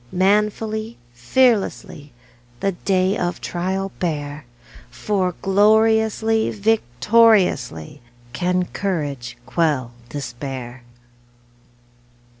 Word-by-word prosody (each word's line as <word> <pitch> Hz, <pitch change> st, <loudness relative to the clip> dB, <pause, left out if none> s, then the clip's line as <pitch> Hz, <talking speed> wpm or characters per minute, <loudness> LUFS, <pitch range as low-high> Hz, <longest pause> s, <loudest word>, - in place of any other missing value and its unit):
Manfully, 215 Hz, +3 st, 0 dB, 0.2 s
fearlessly, 180 Hz, -, 0 dB, 0.5 s
The 195 Hz, -, 0 dB
day 185 Hz, +1 st, 0 dB
of 175 Hz, -3 st, -2 dB
trial 190 Hz, +2 st, -3 dB
bear, 145 Hz, -5 st, -3 dB, 0.4 s
For 185 Hz, -, -1 dB
gloriously, 220 Hz, +2 st, +3 dB
victoriously, 200 Hz, -, +2 dB, 0.3 s
Can 180 Hz, +5 st, 0 dB
courage 140 Hz, -11 st, -3 dB
quell 145 Hz, -8 st, 0 dB, 0.2 s
despair! 130 Hz, -2 st, -6 dB
185 Hz, 70 wpm, -21 LUFS, 145-210 Hz, 0.5 s, gloriously